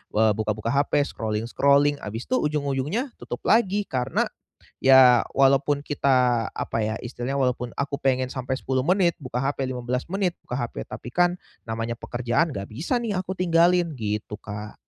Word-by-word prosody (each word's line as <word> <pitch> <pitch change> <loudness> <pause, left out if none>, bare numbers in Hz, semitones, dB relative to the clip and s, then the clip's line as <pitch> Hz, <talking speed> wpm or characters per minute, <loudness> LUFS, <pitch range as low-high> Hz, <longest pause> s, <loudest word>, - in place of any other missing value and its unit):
eee, 110 0 +4
buka-buka 110 +1 -1
HP, 140 +1 +2
scrolling-scrolling 140 +6 +1
habis 110 +3 -6
itu, 255 - +3
ujung-ujungnya, 150 - -1
tutup - - -7
lagi. 205 -2 +3
Karena, 125 -8 -1 0.6
ya, 130 -2 +7
walaupun 140 +1 +3
kita, 125 -5 +1
apa - - -3
ya, 110 - -1
istilahnya, 125 +3 -4
walaupun 125 -2 -1
aku 140 0 -3
pengen 130 -2 0
sampai 130 0 -5
10 130 -1 -1
menit 180 -1 +2
buka 125 -3 -4
HP, 135 0 -1
15 125 0 -3
menit 190 -3 0
buka 125 - -4
HP. 115 - -4
Tapi 120 - -9
kan, 175 +6 +3 0.3
namanya 115 +1 -3
pekerjaan 120 +7 -1
nggak 100 0 -5
bisa 160 - -1
nih, 220 -4 -2
aku 185 0 -4
tinggalin, 170 -2 +3 0.3
gitu 105 -3 -3
Kak. 105 +1 -7
130 Hz, 155 wpm, -24 LUFS, 120-145 Hz, 0.6 s, ya